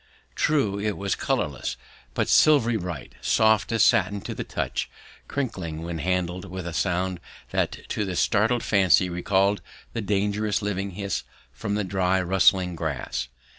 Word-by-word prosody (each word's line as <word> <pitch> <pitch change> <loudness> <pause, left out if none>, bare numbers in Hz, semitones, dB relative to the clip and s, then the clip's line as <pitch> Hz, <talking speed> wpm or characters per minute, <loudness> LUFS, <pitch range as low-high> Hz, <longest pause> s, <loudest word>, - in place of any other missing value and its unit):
True, 130 -10 +1
it 105 -1 -1
was 100 0 -1
colourless, 70 -2 -2 0.4
but - - +1
silvery 135 -7 +5
bright, 85 -8 -5
soft 110 -1 +3
as 115 -2 +4
satin 100 -1 +3
to - - -5
the - - -4
touch, - - -3 0.4
crinkling 95 - -3
when 85 -1 -4
handled 90 0 -1
with 95 -1 -6
a 85 - -4
sound 90 0 0 0.3
that - - -2
to 105 - -1
the 95 -3 -3
startled 110 +6 +2
fancy 95 -2 +4
recalled 95 +3 +1 0.3
the 115 - -2
dangerous 105 0 0
living 100 -1 -2
hiss 100 -3 -2 0.3
from 100 +11 -3
the 105 - 0
dry 95 0 +1
rustling 90 0 +3
grass! 75 -6 -3
95 Hz, 150 wpm, -25 LUFS, 90-105 Hz, 0.4 s, silvery